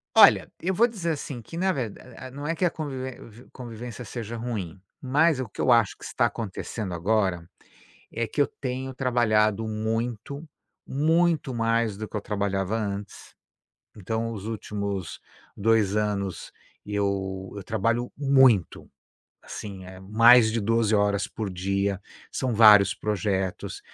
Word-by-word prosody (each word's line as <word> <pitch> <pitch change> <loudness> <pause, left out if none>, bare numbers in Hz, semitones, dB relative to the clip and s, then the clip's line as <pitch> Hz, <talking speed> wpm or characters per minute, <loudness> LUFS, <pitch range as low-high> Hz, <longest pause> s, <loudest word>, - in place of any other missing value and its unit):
Olha, - - +7
eu 185 +3 -1
vou 230 +6 +4
dizer 190 -8 -3
assim 140 -4 -6
que 165 +9 -10
na 190 +2 +2
verda 125 - -4
é, 130 0 -11
não 145 +3 -6
é 165 - 0
que 180 - +1
a 175 - +2
convivê 130 -5 -5 0.4
convivência 120 0 -8
seja 115 0 -6
ruim, 110 -7 -5 0.2
mas 145 +3 +3
o 130 - -3
que - - -7
eu 130 - +3
acho 115 -4 +4
que - - -16
está - - +1
acontecendo 105 -2 -4
agora, 90 -1 0 0.7
é 115 - -1
que 130 - -3
eu - - +2
tenho 130 0 -3
trabalhado 110 -4 +2
muito, 115 +6 -3 0.4
muito 160 -1 +1
mais 115 -2 +1
do 110 +1 -6
que - - -6
eu - - -1
trabalhava 100 0 -1
antes, 100 -2 -5 0.6
então 115 +3 -3
os 105 -3 -7
últimos 100 -4 -4 0.4
2 105 -1 +2
anos 100 -3 -2 0.3
eu 95 -2 -2
eu 100 - -6
trabalho 115 +4 -1
muito, 130 - +3 0.5
assim, 100 -3 -8
eh, 95 0 -11
mais 110 +3 +6
de 115 - 0
12 110 +1 +2
horas 100 -1 +2
por 105 -3 -5
dia, 100 +2 -1 0.3
são 130 -3 -2
vários 105 -3 +7
projetos. 100 -3 -2
110 Hz, 150 wpm, -26 LUFS, 100-125 Hz, 0.7 s, Olha